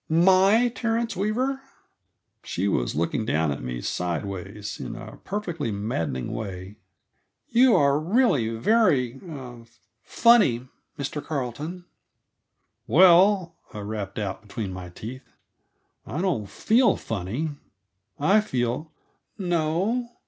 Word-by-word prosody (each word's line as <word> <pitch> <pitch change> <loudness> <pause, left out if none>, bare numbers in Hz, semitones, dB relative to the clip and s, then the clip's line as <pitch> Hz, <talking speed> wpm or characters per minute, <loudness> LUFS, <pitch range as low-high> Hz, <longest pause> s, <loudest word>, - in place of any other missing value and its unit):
"My 185 +4 +5
Mr. 235 +1 +3
Terence 230 -1 -1
Weaver?" 250 +8 -1 0.8
She 95 +3 -2
was 60 -11 0
looking 85 +7 0
down 80 -6 +1
at 70 - -4
me - - -5
sidewise, 95 - -4
in 115 - -6
a 115 -2 -9
perfectly 175 - -4
maddening 85 - -3
way. 95 -1 -6 0.7
"You 245 +1 +5
are 140 0 +4
really 170 - +2
very 130 - +2
er 130 -8 -9 0.4
funny, 190 - +4 0.3
Mr. 145 +1 -4
Carleton." 150 +6 -4 1.0
"Well," 180 - +5 0.2
I 105 - -5
rapped 100 -1 -5
out 100 -3 -3
between 105 -2 -5
my 90 -1 -7
teeth, 115 +9 -9 0.7
"I 150 - -4
don't 170 - -1
feel 235 +3 +3
funny. 115 - -3 0.7
I 195 +9 +4
feel 130 - -2 0.3
" - - -49
"No? 180 +6 0
140 Hz, 115 wpm, -25 LUFS, -, 1.0 s, My